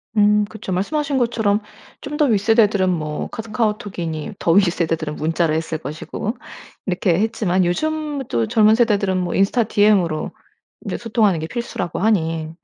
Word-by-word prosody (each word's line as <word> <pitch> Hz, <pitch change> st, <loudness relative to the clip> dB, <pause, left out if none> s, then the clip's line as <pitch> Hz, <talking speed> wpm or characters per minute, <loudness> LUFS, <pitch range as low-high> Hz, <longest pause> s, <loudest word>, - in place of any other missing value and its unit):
음 210 Hz, 0 st, +4 dB
그쵸. 210 Hz, -1 st, -8 dB
말씀하신 280 Hz, +10 st, -1 dB
것처럼 225 Hz, -4 st, +1 dB, 0.4 s
좀 295 Hz, +1 st, -5 dB
더 300 Hz, -, +4 dB
윗세대들은 210 Hz, -4 st, +3 dB
뭐 155 Hz, -4 st, -2 dB
카 -, -, -5 dB
카오톡이니 210 Hz, -8 st, -3 dB
더 165 Hz, -, +1 dB
윗세대들은 165 Hz, -4 st, +1 dB
문자를 160 Hz, 0 st, 0 dB
했을 160 Hz, 0 st, -3 dB
것이고 160 Hz, -, -5 dB, 0.5 s
이렇게 180 Hz, -1 st, +1 dB
했지만 200 Hz, -4 st, +1 dB
요즘 305 Hz, -, -1 dB
또 115 Hz, -2 st, 0 dB
젊은 215 Hz, 0 st, +4 dB
세대들은 205 Hz, -5 st, +2 dB
뭐 180 Hz, -2 st, -2 dB
인스타 200 Hz, +5 st, +2 dB
DM으로 205 Hz, -7 st, +2 dB, 0.5 s
인제 -, -, -3 dB
소통하는 215 Hz, -6 st, +1 dB
게 160 Hz, -, -4 dB
필수라고 235 Hz, -6 st, -4 dB
하니 165 Hz, -6 st, 0 dB
200 Hz, 350 characters per minute, -20 LUFS, 170-225 Hz, 0.5 s, 음